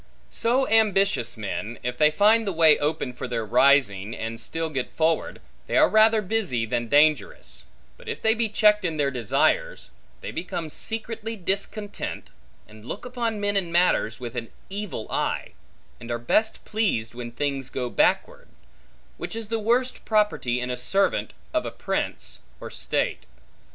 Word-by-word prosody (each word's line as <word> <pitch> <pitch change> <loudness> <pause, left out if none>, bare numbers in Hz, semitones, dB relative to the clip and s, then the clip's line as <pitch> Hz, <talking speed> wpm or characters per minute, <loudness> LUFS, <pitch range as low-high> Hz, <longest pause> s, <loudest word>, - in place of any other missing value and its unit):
So 250 +3 +2
ambitious 195 - +3
men, 110 +2 -4
if 125 0 -2
they 150 +4 +5
find 210 +7 +4
the - - +1
way 160 -3 +6
open 145 -4 -1
for 125 - -6
their 115 -2 -2
rising, 115 -4 +3
and 115 +1 -5
still 165 -1 -3
get 135 -4 -2
forward, 160 0 0 0.3
they - - +1
are - - +7
rather 220 +1 +5
busy 185 - -1
than 120 +1 -2
dangerous; 145 -3 +2 0.3
but - - -10
if - - -4
they 220 - +4
be 230 -1 0
checked 210 0 +4
in 165 -3 -1
their 140 -2 +1
desires, 120 -5 0 0.3
they - - -5
become 170 -3 -4
secretly 225 +3 -4
discontent, 205 +2 -3 0.4
and 110 0 -15
look 120 - -6
upon 235 -3 -2
men 205 0 0
and 180 -4 0
matters 170 -10 +2
with 120 -1 -7
an 115 -1 -4 0.2
evil 200 - -4
eye, - - -1 0.5
and 120 - -10
are 120 - -1
best 215 - 0
pleased, 195 - 0
when 120 0 -7
things 135 0 -2
go 125 -2 -3
backward; - - +1 0.7
which - - -5
is 225 -2 -5
the 225 0 0
worst 245 +4 0
property 210 - +1
in 125 0 -3
a 125 - -2
servant 195 +10 +1 0.2
of 315 - +1
a - - -3
prince, - - -3 0.2
or - - -8
state. - - -2
160 Hz, 165 wpm, -25 LUFS, -, 0.7 s, are